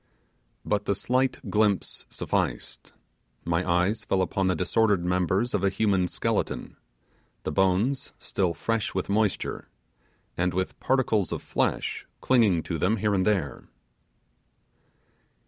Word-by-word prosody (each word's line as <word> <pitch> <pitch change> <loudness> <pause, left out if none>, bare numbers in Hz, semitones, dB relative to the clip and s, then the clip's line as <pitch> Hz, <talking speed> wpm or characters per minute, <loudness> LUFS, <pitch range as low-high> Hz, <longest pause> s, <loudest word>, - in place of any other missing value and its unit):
But 105 - 0
the 100 - +1
slight 130 +5 0
glimpse 105 -2 0
sufficed; - - -3 0.5
my 85 +1 +1
eyes 90 +5 +2
fell 95 -1 +1
upon 95 +1 0
the 90 - +2
disordered 95 +2 +2
members 90 +6 +1
of 100 - 0
a 100 - +4
human 95 -2 +1
skeleton, - - -2 0.7
the - - -2
bones 95 - +1
still 90 -4 -1
fresh 115 -4 -1
with 95 - -2
moisture, 105 -1 0 0.7
and 90 0 0
with 95 0 -2
particles 115 - +1
of - - -4
flesh - - -1
clinging 105 -10 +3
to 85 -3 -3
them 105 +8 +2
here 105 0 +1
and 95 0 +1
there! 95 -9 -1
95 Hz, 130 wpm, -27 LUFS, 90-110 Hz, 0.7 s, a